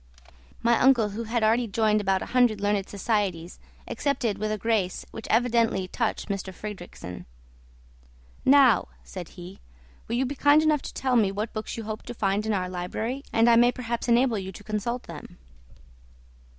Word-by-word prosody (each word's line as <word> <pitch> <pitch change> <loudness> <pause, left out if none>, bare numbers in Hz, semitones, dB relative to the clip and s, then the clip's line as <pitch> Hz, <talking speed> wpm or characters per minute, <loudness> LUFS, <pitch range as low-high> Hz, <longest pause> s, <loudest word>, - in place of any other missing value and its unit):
My 235 0 +3
uncle, 245 -5 +4
who 225 +3 -5
had 230 0 -1
already 230 +2 +3
joined 215 0 +2
about 195 -1 0
a - - -10
hundred 245 -4 +3
learned 205 -1 0
societies, 195 -5 -2 0.3
accepted 235 -8 -1
with 215 +1 -1
a 215 - -1
grace 210 -4 -1
which 225 - -8
evidently 230 -5 +2
touched 220 +1 -2
M. 200 - 0
Fridrikssen. 185 - -8 1.2
"Now," 270 -4 +5 0.2
said 180 -4 -8
he, 180 +2 -10 0.5
"will 230 - -2
you 260 +2 +1
be 265 - -3
kind 290 +2 +4
enough 305 -2 +2
to - - -8
tell 260 -2 0
me 210 -5 +3
what 210 +3 -4
books 215 +1 -5
you 225 - -5
hoped 215 0 -6
to 240 - -6
find 205 0 0
in 220 - +1
our 185 -2 -1
library 185 +9 -4
and 225 +1 +3
I 235 -1 +6
may 240 +1 +5
perhaps 235 -1 -4
enable 235 -2 +3
you 190 0 -6
to 200 - -12
consult 215 +4 -3
them?" - - -11
220 Hz, 175 wpm, -26 LUFS, 200-240 Hz, 1.2 s, I